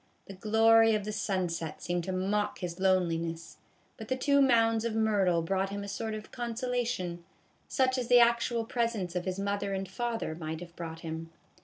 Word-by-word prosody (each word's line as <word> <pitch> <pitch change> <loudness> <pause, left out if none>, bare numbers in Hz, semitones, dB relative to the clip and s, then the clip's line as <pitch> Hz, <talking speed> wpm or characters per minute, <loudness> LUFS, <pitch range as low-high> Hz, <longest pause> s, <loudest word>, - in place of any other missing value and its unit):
The 195 - -9
glory 225 +3 +5
of 210 -1 -2
the 215 - -3
sun 195 -3 -1
set 165 -2 -5
seemed 175 -1 -2
to 190 - -3
mock 200 +3 -1
his 175 -1 -5
loneliness; 170 -3 0 0.4
but 220 -3 -8
the 260 - 0
two 280 +2 +3
mounds 225 -4 +4
of 230 -1 -2
myrtle 200 -6 +2
brought 195 +3 0
him 200 0 -4
a - - -6
sort 220 +2 -3
of 215 0 -9
consolation, 235 -7 -2 0.4
such 260 -1 +1
as 245 - -3
the 245 0 +7
actual 235 -1 +3
presence 225 -7 -2
of 180 - -2
his 185 0 -2
mother 200 0 -2
and 190 0 -3
father 225 -1 -3
might 160 -1 -5
have 170 0 -11
brought 165 -1 -7
him. 165 0 -6
200 Hz, 190 wpm, -30 LUFS, 175-230 Hz, 0.4 s, the